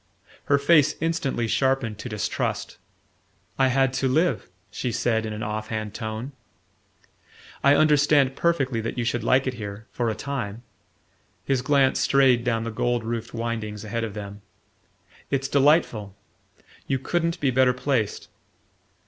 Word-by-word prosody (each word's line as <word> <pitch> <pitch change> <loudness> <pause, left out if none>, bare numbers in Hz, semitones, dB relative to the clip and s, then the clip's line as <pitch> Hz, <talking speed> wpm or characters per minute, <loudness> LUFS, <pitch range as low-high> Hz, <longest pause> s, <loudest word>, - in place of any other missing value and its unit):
Her 140 - +3
face 145 0 +4
instantly 155 -8 -1
sharpened 130 -4 0
to 125 - -6
distrust. 105 -2 -3 0.8
"I 135 - +5
had 135 0 +2
to 130 +1 0
live," 160 - +1 0.2
she 125 +3 -3
said 110 -1 0
in - - -5
an 105 +1 -5
off 105 +1 -3
hand 110 -2 -4
tone. 110 +5 -5 1.3
"I 140 +1 +6
understand 145 -3 +4
perfectly 135 -9 0
that 115 +3 -4
you 120 - 0
should 120 -1 -1
like 130 +3 +3
it 130 - -1
here 105 -2 -7
for 120 -2 -1
a 110 - -2
time." 120 -5 -5 0.8
His 135 -2 +1
glance 135 -1 +3
strayed 130 -3 +4
down 115 -2 0
the 115 - -4
gold 120 +1 -1
roofed 115 0 -4
windings 110 -3 -4
ahead 115 +2 -3
of 110 -3 -5
them. 100 -1 -7 0.9
"It's 135 -1 0
delightful: 135 - +2 0.7
you 135 - +1
couldn't 170 +5 -1
be 140 -4 +1
better 130 0 +4
placed. 125 -4 -1
125 Hz, 150 wpm, -24 LUFS, 110-140 Hz, 1.3 s, I